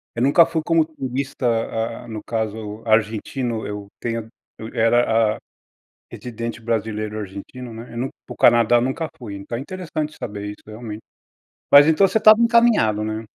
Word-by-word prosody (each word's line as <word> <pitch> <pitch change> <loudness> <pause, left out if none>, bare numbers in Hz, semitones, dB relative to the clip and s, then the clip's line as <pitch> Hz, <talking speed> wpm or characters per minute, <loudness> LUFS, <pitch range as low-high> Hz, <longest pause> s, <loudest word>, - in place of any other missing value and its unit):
eu 120 - -2
nunca 145 +6 +6
fui 160 -1 -2
como 165 -1 +3
turista, 135 -3 -4
hã, 115 +1 -2
no 110 -2 -6
caso 110 -1 -4
argentino. 110 +2 0
Eu 105 -1 -6
tenho 115 -2 -3
a - - -20 0.3
eu 110 - -6
era, 115 -1 +3
hã, - - -10 0.7
residente 115 -1 -6
brasileiro 110 -1 -2
argentino, 105 +5 -8
né. 115 +2 -10
Eu - - -7
nun 130 +3 -2 0.2
para - - -7
o - - -17
Canadá 120 0 +5
eu 120 - +4
nunca 150 +6 -2
fui. 110 -6 -8
Então, 100 +4 -6
é 125 - -5
interessante 155 -3 -5
saber 105 -2 -5
isso 105 - -13
realmente. 110 0 -8 0.7
Mas, 145 +1 +9
então, 160 +5 +5
você 220 - +1
estava 215 0 +7
encaminhado, 230 - +3
né? 110 +1 -3
115 Hz, 175 wpm, -21 LUFS, 110-135 Hz, 0.7 s, Mas